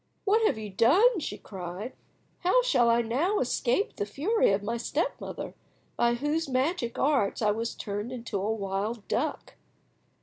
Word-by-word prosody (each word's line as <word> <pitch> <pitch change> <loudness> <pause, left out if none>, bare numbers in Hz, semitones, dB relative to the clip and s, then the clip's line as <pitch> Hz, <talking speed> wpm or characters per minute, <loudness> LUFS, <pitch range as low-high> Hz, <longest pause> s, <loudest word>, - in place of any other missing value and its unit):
"What 430 +3 +4
have - - 0
you 215 -2 -6
done?" 345 - +5
she - - -4
cried. 190 +4 -7 0.5
"How 380 +8 +3
shall 245 - +3
I 235 +1 +3
now 295 - +1
escape 250 - 0
the 205 - -1
fury 350 - +2
of 195 +1 0
my 230 +3 -2
step 265 +7 -2
mother, - - -6 0.4
by 235 0 +2
whose 295 +4 -1
magic 260 -1 0
arts 270 -9 +2
I 210 - +4
was 230 +2 -3
turned 205 +3 -4
into 230 -5 -4
a 210 +3 0
wild 205 +1 -3
duck?" - - -2
235 Hz, 165 wpm, -28 LUFS, 210-305 Hz, 0.5 s, done